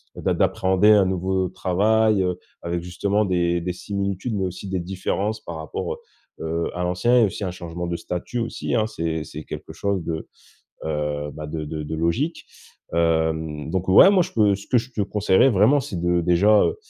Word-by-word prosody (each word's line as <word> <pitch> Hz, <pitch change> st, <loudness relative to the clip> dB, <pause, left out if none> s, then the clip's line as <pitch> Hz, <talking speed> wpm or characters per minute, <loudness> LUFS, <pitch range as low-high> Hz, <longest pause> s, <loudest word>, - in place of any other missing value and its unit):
d'a -, -, 0 dB
d'appréhender 95 Hz, +3 st, +3 dB
un 100 Hz, -3 st, +6 dB
nouveau 95 Hz, 0 st, 0 dB
travail, 105 Hz, +3 st, +2 dB
heu, 90 Hz, -1 st, -2 dB, 0.2 s
avec 85 Hz, 0 st, -2 dB
justement 100 Hz, +4 st, 0 dB
des 85 Hz, -2 st, +1 dB
des 90 Hz, +1 st, -3 dB
similitudes, 100 Hz, +4 st, -3 dB
mais 95 Hz, -1 st, 0 dB
aussi 95 Hz, +2 st, -6 dB
des 95 Hz, -1 st, -1 dB
différences 95 Hz, +4 st, -2 dB
par 85 Hz, -1 st, -7 dB
rapport, 80 Hz, -, -4 dB
heu -, -, -16 dB, 0.4 s
heu, 85 Hz, +1 st, -2 dB
à 90 Hz, -, -3 dB
l'ancien 90 Hz, +8 st, +2 dB
et 115 Hz, -, +6 dB
aussi 100 Hz, 0 st, -4 dB
un 90 Hz, -, -2 dB
changement 85 Hz, -1 st, -6 dB
de 85 Hz, -, -2 dB
statut 90 Hz, +7 st, -4 dB
aussi, 115 Hz, +1 st, -3 dB
hein. 110 Hz, -2 st, +2 dB
C'est 80 Hz, -5 st, -3 dB
c'est 75 Hz, +2 st, -8 dB
quelque -, -, -8 dB
chose 100 Hz, -3 st, -1 dB
de, 80 Hz, -1 st, -4 dB, 0.6 s
heu, 75 Hz, -1 st, -2 dB
ben 75 Hz, -, -7 dB
de 75 Hz, 0 st, -4 dB
de 75 Hz, 0 st, -4 dB
de 75 Hz, +2 st, -5 dB
logique. 100 Hz, -, -1 dB, 0.5 s
Hem, 80 Hz, -2 st, 0 dB
donc, 95 Hz, 0 st, -1 dB
ouais, 95 Hz, -, +8 dB
moi, 190 Hz, -3 st, +4 dB
je -, -, -9 dB
peux, 105 Hz, -3 st, +3 dB
ce 100 Hz, -, -12 dB
que -, -, +2 dB
je 120 Hz, +2 st, -5 dB
te 110 Hz, -, -3 dB
conseillerais 100 Hz, +4 st, +3 dB
vraiment, 110 Hz, +7 st, +4 dB
c'est 110 Hz, -, -7 dB
de, 85 Hz, 0 st, +2 dB
déjà, 100 Hz, +5 st, +4 dB
heu, -, -, 0 dB
90 Hz, 200 wpm, -23 LUFS, 85-105 Hz, 0.6 s, ouais